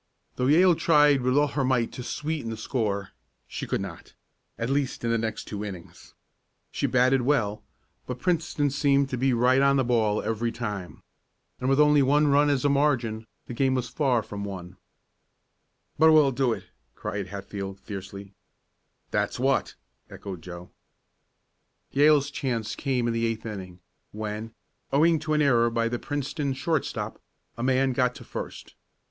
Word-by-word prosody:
Though 125 - 0
Yale 175 +5 +6
tried 150 -4 +4
with 130 +2 +1
all 145 0 +3
her 140 0 -1
might 125 -3 +1
to - - -7
sweeten 150 0 -3
the 110 - -5
score, 105 -4 -2 0.4
she - - -6
could - - -1
not - - -9 0.4
at 115 - -2
least 140 -3 -1
in 115 - 0
the 115 - +2
next 110 0 -3
two 105 -1 -5
innings. 95 -5 -10 0.6
She - - -1
batted 130 +1 +3
well, 115 -6 0 0.4
but 125 - -4
Princeton 155 -3 0
seemed 140 -1 +2
to 130 - -1
be 135 +1 +2
right 125 +2 +3
on 140 0 +4
the 135 - +3
ball 110 -4 +1
every 115 +1 -1
time. 105 -7 -6 0.6
And 130 - -1
with 135 +1 +3
only 150 -1 +5
one 145 +2 +3
run 145 +1 +4
as 140 -1 +1
a - - +6
margin, 130 -6 +1 0.2
the - - -7
game 130 +2 +1
was 125 -2 -2
far 125 -4 +1
from 100 -1 -6
won. 95 -2 -7 1.2
"But 160 0 +7
we'll 150 -3 +6
do 130 -1 +1
it!" - - -3 0.3
cried 100 -1 -4
Hatfield, 100 0 -6
fiercely. 100 0 -8 0.8
"That's - - -1
what!" - - +1 0.3
echoed 95 -4 -8
Joe. 90 +1 -10 1.2
Yale's 145 0 +4
chance 120 -6 -2
came 130 -4 -1
in 115 - 0
the 115 0 0
eighth 115 0 -4
inning, 95 -5 -7 0.3
when, 110 +1 -5 0.4
owing 160 +3 +4
to 155 0 -2
an 150 - +3
error 120 -4 +4
by 115 0 0
the 120 +1 -3
Princeton 145 0 -3
shortstop, 155 +2 -2 0.3
a 115 - -6
man 130 +1 +2
got 125 0 +1
to - - -10
first. - - -7
125 Hz, 165 wpm, -26 LUFS, 110-140 Hz, 1.2 s, But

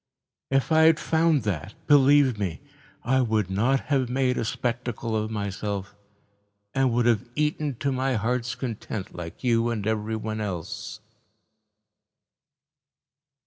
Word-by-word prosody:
If 135 0 +1
had 160 0 +5
found 160 -2 +2
that, 100 -2 -3
believe 140 -4 +5
me, 85 -7 -2 0.4
I 130 +2 +2
would 110 -5 0
not 120 +8 +2
have 135 -3 0
made 130 0 +1
a - - -1
spectacle 120 -1 -2
of 110 0 -1
myself 100 -1 -4 0.8
and 135 -2 +2
would 120 0 +1
have 115 -1 +2
eaten 150 -2 0
to 140 +4 -1
my 130 0 0
heart's 125 +3 -1
content, 110 -5 -5
like 85 +5 -8
you 115 -1 +2
and 110 -4 -2
everyone 110 0 -2
else." 105 +3 -5
115 Hz, 125 wpm, -26 LUFS, 105-130 Hz, 0.8 s, had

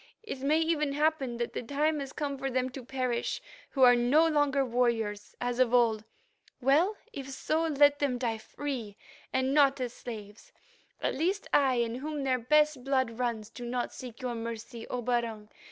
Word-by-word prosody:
It 425 -12 -6
may 285 +4 +2
even 310 -3 +1
happen 290 -5 0
that 235 0 -3
the - - -3
time 295 +5 0
has 275 -1 -5
come 285 -1 -3
for 270 0 -3
them 255 0 -1
to 260 0 -8
perish, 255 -1 -2 0.3
who 270 - +1
are 245 -1 +8
no 265 +7 +4
longer 290 -3 +2
warriors, 230 -4 -1
as 245 0 -2
of 250 -1 +4
old. 225 -3 +3 0.5
Well, 305 - +3 0.2
if 275 -6 -6
so, 315 +4 0
let 290 -1 +4
them 275 -4 +1
die 230 -3 -2
free, 240 -5 -5 0.3
and 260 +1 +1
not 280 -2 +4
as 245 -2 -3
slaves. 210 -3 -9 0.5
At - - +1
least 365 +8 -1
I, 270 -3 +4
in 235 -1 0
whom 290 +3 -4
their 260 -1 +1
best 300 +2 +3
blood 260 -3 0
runs, 230 -3 -2
do 245 - -9
not 240 0 -2
seek 250 0 -9
your 250 -1 -1
mercy, 230 0 -6
O 250 -1 -3
Barung. 230 -3 -1
255 Hz, 185 wpm, -30 LUFS, 235-285 Hz, 0.5 s, are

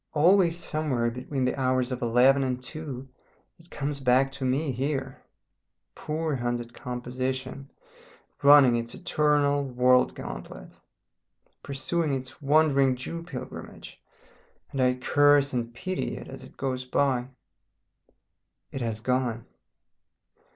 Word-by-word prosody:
Always 170 +2 +4
somewhere 145 -8 -1
between 130 +2 -3
the 125 - +1
hours 130 -1 +1
of 125 0 -4
eleven 125 +4 +4
and 125 -1 -1
two 135 0 -7 0.5
it 165 +1 -20
comes 145 -1 -4
back 130 +1 +3
to 140 0 -7
me 135 +3 0
here, 135 +1 -3 0.7
poor 155 0 -3
hunted 120 -1 -3
composition, 130 +2 -4 0.7
running 140 -4 +7
its 115 0 -3
eternal 145 -1 +1
world 125 -1 +3
gauntlet, - - -9 0.8
pursuing 145 +3 -2
its 130 -1 -8
Wandering 140 -2 +3
Jew 150 +7 -6
pilgrimage, 160 -7 -9 0.7
and 135 - -2
I 125 0 +3
curse 145 +2 +3
and 120 -1 -2
pity 185 +10 -4
it - - -9
as - - -9
it - - -14
goes 130 -1 -2
by.... 125 -1 0 1.4
It 135 - -5
has 110 -2 -3
gone. 125 -2 -1
130 Hz, 120 wpm, -27 LUFS, 125-145 Hz, 1.4 s, running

